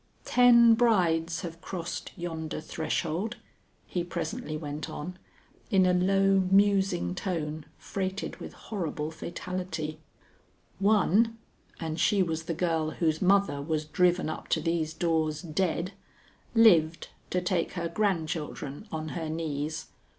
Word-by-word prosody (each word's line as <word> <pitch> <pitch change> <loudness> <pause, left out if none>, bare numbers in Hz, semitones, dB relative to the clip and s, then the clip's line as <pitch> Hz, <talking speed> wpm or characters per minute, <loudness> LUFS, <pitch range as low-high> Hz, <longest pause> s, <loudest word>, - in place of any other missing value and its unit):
"Ten 235 -2 +7
brides 175 -8 +2
have 170 -2 -7
crossed 175 -3 -5
yonder 165 -3 -4
threshold," 165 +7 -2 0.5
he 175 - -2
presently 175 +1 -4
went 150 0 -5
on 175 +4 -6 0.5
in 190 -2 +4
a 180 - +4
low 195 +2 +3
musing 195 -2 +3
tone 160 -5 -3
freighted 190 0 -4
with - - -8
horrible 160 -7 -4
fatality. 165 -2 -5 0.8
"One 215 +2 +3 0.4
and 160 -1 -3
she 195 +3 +4
was 165 -2 -3
the 165 - -2
girl 165 -2 0
whose 160 -1 0
mother 195 -6 +3
was 155 +1 -1
driven 180 +3 +2
up 155 - -5
to - - +1
these 160 -1 -1
doors 160 -2 0
dead 170 +2 -1 0.6
lived 170 -8 +5 0.2
to 180 - +1
take 180 -2 -1
her 170 -2 -2
grandchildren 165 -3 -2
on 155 0 -4
her 160 -1 -4
knees. 155 -1 -3
170 Hz, 125 wpm, -28 LUFS, 160-190 Hz, 0.8 s, Ten